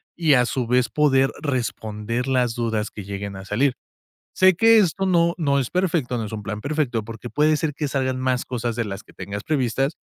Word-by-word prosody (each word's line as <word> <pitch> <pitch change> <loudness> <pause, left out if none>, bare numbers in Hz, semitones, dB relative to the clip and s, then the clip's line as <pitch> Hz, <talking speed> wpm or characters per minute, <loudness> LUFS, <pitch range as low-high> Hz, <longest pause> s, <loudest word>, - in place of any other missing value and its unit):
Y, 160 -4 +3
a 125 -2 +4
su 125 -1 -2
vez, 125 0 +2
poder 135 -3 +3
responder 115 -3 -3
las 125 -3 +1
dudas 110 -3 -1
que 105 - -8
lleguen 100 0 -5
a 95 - -9
salir. 125 +7 +1 0.6
Sé 185 0 +5
que 225 +5 +6
esto 195 -1 +2
no 170 -2 +3
no 140 -4 +2
es 130 -3 -1
perfecto, 170 -9 0
no 115 - -2
es 105 - -7
un 105 -1 -5
plan 105 0 -4
perfecto, 135 -5 -1
porque 115 +2 -8
puede 155 +1 +3
ser 150 -1 -2
que 150 -1 -2
salgan 130 -2 -1
más 130 -1 0
cosas 120 -2 -3
de 120 - 0
las 100 -2 -6
que - - -20
tengas 100 +2 -6
previstas, 135 0 0
130 Hz, 215 wpm, -23 LUFS, 115-150 Hz, 0.6 s, que